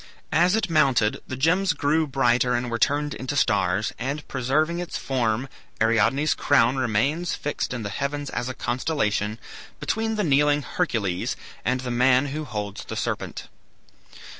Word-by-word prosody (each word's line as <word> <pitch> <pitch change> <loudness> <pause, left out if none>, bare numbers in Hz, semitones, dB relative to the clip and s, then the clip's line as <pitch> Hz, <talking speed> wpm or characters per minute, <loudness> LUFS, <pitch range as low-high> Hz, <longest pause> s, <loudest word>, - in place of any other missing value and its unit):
As 180 +4 +4
it 225 - 0
mounted 135 -10 +2
the 130 - -4
gems 180 +8 +2
grew 155 +2 +1
brighter 125 -2 +2
and 120 0 -2
were 115 - -1
turned 145 +4 +1
into 130 +2 -4
stars, 100 -4 +1
and 140 +4 -3
preserving 150 +6 0
its 175 -1 -4
form 125 -1 -1 0.3
Ariadne's 115 +7 +3
crown 130 -2 +3
remains 130 +8 0
fixed 150 - -3
in 125 -3 -4
the 100 - -3
heavens 140 +6 -3
as 125 - -3
a 130 - -5
constellation, 110 -5 -1 0.4
between 225 0 -1
the 210 - 0
kneeling 145 -1 +3
Hercules 110 - -1 0.3
and 130 +1 0
the 125 -1 -4
man 125 +3 +3
who 150 +2 -4
holds 105 -5 -5
the - - -6
serpent. - - -3
130 Hz, 155 wpm, -24 LUFS, 120-150 Hz, 0.4 s, As